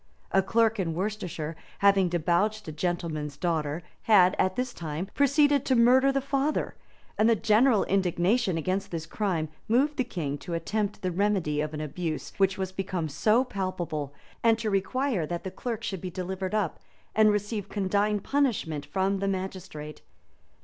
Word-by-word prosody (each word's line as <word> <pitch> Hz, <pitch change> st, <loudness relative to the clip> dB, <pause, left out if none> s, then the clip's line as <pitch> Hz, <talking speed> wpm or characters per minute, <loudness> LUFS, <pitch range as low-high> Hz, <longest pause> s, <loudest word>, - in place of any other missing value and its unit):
A 195 Hz, -, +4 dB
clerk 225 Hz, +2 st, +2 dB
in 165 Hz, -4 st, -1 dB
Worcestershire, 180 Hz, -5 st, -3 dB, 0.2 s
having 195 Hz, -2 st, +4 dB
debauched 175 Hz, +5 st, 0 dB
a -, -, -4 dB
gentleman's 155 Hz, -3 st, -3 dB
daughter, 160 Hz, -1 st, -1 dB, 0.2 s
had, 190 Hz, -5 st, +6 dB
at 185 Hz, 0 st, +2 dB
this 250 Hz, -1 st, -2 dB
time, 160 Hz, +2 st, -4 dB
proceeded 285 Hz, 0 st, +3 dB
to 260 Hz, -, +3 dB
murder 255 Hz, +3 st, +5 dB
the 275 Hz, -, +1 dB
father; 275 Hz, +2 st, -1 dB, 0.5 s
and 220 Hz, +2 st, +5 dB
the 230 Hz, -, +5 dB
general 220 Hz, +2 st, +4 dB
indignation 190 Hz, +2 st, +1 dB
against 185 Hz, +5 st, -1 dB
this 165 Hz, -2 st, -4 dB
crime 170 Hz, -3 st, -1 dB, 0.2 s
moved 275 Hz, +6 st, +2 dB
the 255 Hz, -, +2 dB
king 155 Hz, -, -4 dB
to 170 Hz, -, -5 dB
attempt 205 Hz, +4 st, -2 dB
the 185 Hz, -, 0 dB
remedy 180 Hz, -6 st, +1 dB
of 155 Hz, 0 st, -3 dB
an 150 Hz, -, -4 dB
abuse 155 Hz, +1 st, -4 dB
which 195 Hz, -1 st, +2 dB
was 190 Hz, -1 st, -3 dB
become 185 Hz, -4 st, -3 dB
so 215 Hz, -, +3 dB
palpable, 185 Hz, -, -3 dB, 0.3 s
and 225 Hz, -1 st, +5 dB
to 220 Hz, -2 st, -2 dB
require 200 Hz, -, 0 dB
that 175 Hz, +1 st, -4 dB
the 190 Hz, -, -5 dB
clerk 230 Hz, 0 st, -4 dB
should 190 Hz, -6 st, -3 dB
be 185 Hz, -, -4 dB
delivered 185 Hz, +2 st, -4 dB
up, 210 Hz, -, -1 dB, 0.3 s
and 215 Hz, 0 st, +5 dB
receive 205 Hz, -1 st, -1 dB
condign 205 Hz, +1 st, +1 dB
punishment 200 Hz, -, -1 dB
from 190 Hz, +5 st, 0 dB
the 195 Hz, -, -1 dB
magistrate. 185 Hz, -6 st, -5 dB
190 Hz, 165 wpm, -27 LUFS, 170-220 Hz, 0.5 s, had